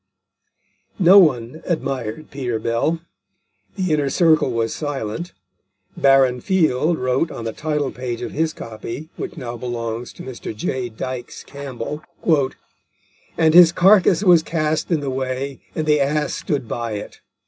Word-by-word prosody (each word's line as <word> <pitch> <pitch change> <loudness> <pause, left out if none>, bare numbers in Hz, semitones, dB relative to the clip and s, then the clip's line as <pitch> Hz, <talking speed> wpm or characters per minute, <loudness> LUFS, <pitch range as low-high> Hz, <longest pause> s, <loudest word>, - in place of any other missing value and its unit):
No 190 +1 +8
one 135 -3 +2
admired 135 -5 -3
Peter 125 -4 -2
Bell. 115 +9 -1 0.7
The 185 -5 0
inner 145 -2 +1
circle 155 -2 +3
was 115 -2 -1
silent. 145 +1 -4 0.6
Baron 135 -2 +4
Field 160 -2 +2
wrote 130 +5 0
on 115 - -7
the 115 - -3
title 150 -3 -2
page 120 -2 -5
of - - -5
his 160 +1 0
copy, 115 +7 -8
which - - -6
now 120 -4 -5
belongs 115 -1 -4
to - - -10
Mr. 125 -4 -7
J. 125 +3 -3
Dykes 120 +2 -6
Campbell, 140 +1 -6 1.4
"And 160 -1 +4
his 175 -1 +9
carcass 185 0 +5
was 175 -4 +6
cast 155 -1 -1
in 165 -4 +1
the 140 -2 -2
way, 130 +1 -3
and 155 - -1
the 150 -1 +3
Ass 150 +1 0
stood 140 -5 -2
by 115 -1 -3
it." 105 - -7
140 Hz, 145 wpm, -21 LUFS, 120-160 Hz, 1.4 s, his